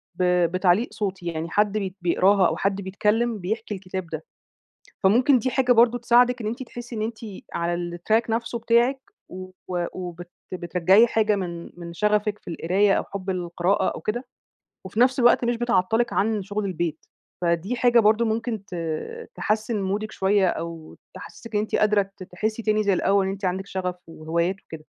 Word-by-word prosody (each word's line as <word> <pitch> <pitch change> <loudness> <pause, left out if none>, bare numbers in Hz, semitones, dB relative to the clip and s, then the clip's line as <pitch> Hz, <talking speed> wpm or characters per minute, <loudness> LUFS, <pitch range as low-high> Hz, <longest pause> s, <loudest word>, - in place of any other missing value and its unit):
ب 185 - -1 0.3
بتعليق 185 +5 +2
صوتي، 190 -4 -4
يعني 165 -1 -3
حد 210 +2 +1
بي 190 -3 -3
بيقراها 185 +2 +4
أو - - -2
حد 195 0 0
بيتكلَّم 210 +4 0
بيحكِي 215 +3 -3
الكتاب 185 -1 -6
ده. - - -6 0.8
فممكن 245 +7 +5
دي 255 +3 -1
حاجة 255 -1 +2
برضه 240 0 +5
تساعدِك 245 +1 +4
إن 215 - -3
أنتِ 235 +4 -4
تحسِّي 240 -1 -9
إن 215 - -3
أنتِ 220 +1 -3 0.4
على 175 0 -2
الtrack 220 +7 +1
نفسه 230 +1 -2
بتاعِك، 235 +4 +2 0.3
و 185 0 -8 0.4
وبت 175 -1 -7 0.2
وبترجعِي 185 +5 +4
حاجة 215 -2 +2
من 170 -3 -5
من 170 0 -8
شغَفِك 210 +2 +1
في - - -11
القراية 190 +4 +2
أو - - +1
حُب 195 -1 -7
القراءة 175 +1 0
أو - - -8
كده، 240 +5 -3 0.6
وفي 190 +4 -4
نفس 255 +1 +4
الوقت 240 0 +5
مش 240 0 +1
بتعطِّلِك 235 0 +1
عن 215 +1 +1
شغل 205 +1 -3
البيت. 170 -4 -3 0.4
فدي 170 +6 0
حاجة 240 -1 +4
برضه 220 +2 +4
ممكن 225 -2 -2
ت 185 - -8 0.6
تحسّن 215 0 -1
مودِك 205 +3 -2
شوية، 195 0 +2
أو 165 -1 -6 0.2
تحسّسِك 230 -2 -10
إن 210 - +3
أنتِ 215 - -2
قادرة 205 -2 +2
ت 185 - -8
تحسّي 215 +5 -3
تاني 215 0 +2
زي 200 -2 +2
الأوَّل، 195 +2 +2
إن 190 - -1
أنتِ 195 0 -5
عندِك 190 +2 -2
شغَف 185 -2 -3
وهوايات 170 +3 -1
وكده. 155 -1 -10
200 Hz, 175 wpm, -24 LUFS, 180-225 Hz, 0.8 s, فممكن